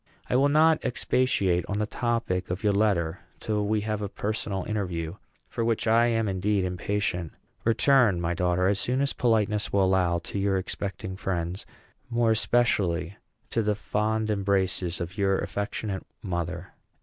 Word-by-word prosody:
I -, -, +3 dB
will 140 Hz, +3 st, +4 dB
not 155 Hz, +2 st, +4 dB
expatiate 120 Hz, -8 st, +1 dB
on 100 Hz, -, -2 dB
the 105 Hz, -, +1 dB
topic 115 Hz, -5 st, -1 dB
of 90 Hz, +4 st, -3 dB
your 105 Hz, -1 st, +3 dB
letter 100 Hz, -6 st, +1 dB, 0.2 s
till 105 Hz, -1 st, -1 dB
we 105 Hz, 0 st, +1 dB
have 105 Hz, 0 st, -2 dB
a 100 Hz, -, -3 dB
personal 105 Hz, -2 st, -3 dB
interview, 90 Hz, -6 st, -3 dB, 0.3 s
for 115 Hz, -, -3 dB
which 115 Hz, -1 st, 0 dB
I 115 Hz, +1 st, +4 dB
am 115 Hz, -2 st, +1 dB
indeed 95 Hz, +1 st, 0 dB
impatient. 90 Hz, -2 st, -2 dB, 0.3 s
Return, 115 Hz, -4 st, +4 dB
my 85 Hz, 0 st, -1 dB
daughter, 90 Hz, +1 st, +1 dB
as 100 Hz, +1 st, +2 dB
soon 125 Hz, +4 st, 0 dB
as 140 Hz, -, +1 dB
politeness 105 Hz, -3 st, +1 dB
will 100 Hz, -1 st, +3 dB
allow, 90 Hz, -2 st, +2 dB
to 85 Hz, +4 st, -5 dB
your 100 Hz, -1 st, +1 dB
expecting 95 Hz, 0 st, -4 dB
friends; 90 Hz, -1 st, -3 dB, 0.4 s
more 120 Hz, -1 st, +2 dB
especially 100 Hz, -6 st, +1 dB, 0.3 s
to 115 Hz, -, +1 dB
the 105 Hz, -1 st, +1 dB
fond 110 Hz, +1 st, -1 dB
embraces 95 Hz, -3 st, 0 dB
of 90 Hz, +4 st, -5 dB
your 95 Hz, -1 st, +3 dB
affectionate 100 Hz, -1 st, -3 dB, 0.2 s
mother. 85 Hz, -4 st, -4 dB
100 Hz, 160 wpm, -27 LUFS, 90-110 Hz, 0.4 s, will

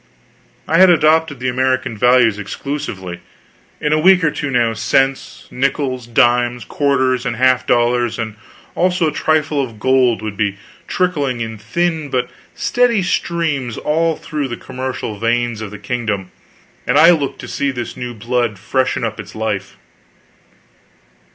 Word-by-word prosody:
I 165 Hz, -, +3 dB
had 190 Hz, 0 st, +8 dB
adopted 160 Hz, -3 st, +3 dB
the 130 Hz, -, -2 dB
American 130 Hz, -2 st, 0 dB
values 120 Hz, -2 st, +4 dB
exclusively. 100 Hz, -6 st, -5 dB, 0.6 s
In 150 Hz, 0 st, 0 dB
a 155 Hz, -, +3 dB
week 180 Hz, +2 st, +5 dB
or 150 Hz, -, +3 dB
two 145 Hz, -, -4 dB
now, 120 Hz, -3 st, +1 dB
cents, 135 Hz, +5 st, 0 dB
nickels, 130 Hz, -2 st, -1 dB
dimes, 120 Hz, 0 st, +2 dB
quarters, 130 Hz, -3 st, +1 dB
and 125 Hz, -2 st, -2 dB
half 130 Hz, +1 st, +2 dB
dollars, 120 Hz, 0 st, +2 dB
and 110 Hz, -2 st, -4 dB, 0.4 s
also 180 Hz, -2 st, +1 dB
a -, -, -7 dB
trifle 155 Hz, -2 st, +1 dB
of 115 Hz, -4 st, -8 dB
gold, 130 Hz, -2 st, +2 dB
would 105 Hz, -2 st, -4 dB
be 100 Hz, -1 st, -1 dB, 0.3 s
trickling 145 Hz, -9 st, 0 dB
in 115 Hz, -2 st, -5 dB
thin 160 Hz, +7 st, -1 dB
but 125 Hz, -2 st, -1 dB, 0.2 s
steady 240 Hz, -5 st, +2 dB
streams 160 Hz, -9 st, -1 dB
all 160 Hz, +1 st, +1 dB
through 150 Hz, -3 st, -4 dB
the 120 Hz, -, -5 dB
commercial 130 Hz, -5 st, -5 dB
veins 120 Hz, -1 st, 0 dB
of 110 Hz, -, -5 dB
the 105 Hz, -, -9 dB
kingdom, 105 Hz, -6 st, -3 dB, 0.6 s
and -, -, +3 dB
I 165 Hz, +2 st, +8 dB
looked 145 Hz, -5 st, 0 dB
to -, -, -8 dB
see 140 Hz, -, -1 dB
this 125 Hz, -3 st, -5 dB
new 125 Hz, -1 st, -6 dB
blood 120 Hz, -1 st, -1 dB
freshen 130 Hz, +7 st, -1 dB
up 110 Hz, -1 st, -3 dB
its -, -, -9 dB
life. 105 Hz, -3 st, -3 dB
130 Hz, 150 wpm, -18 LUFS, 115-150 Hz, 0.6 s, had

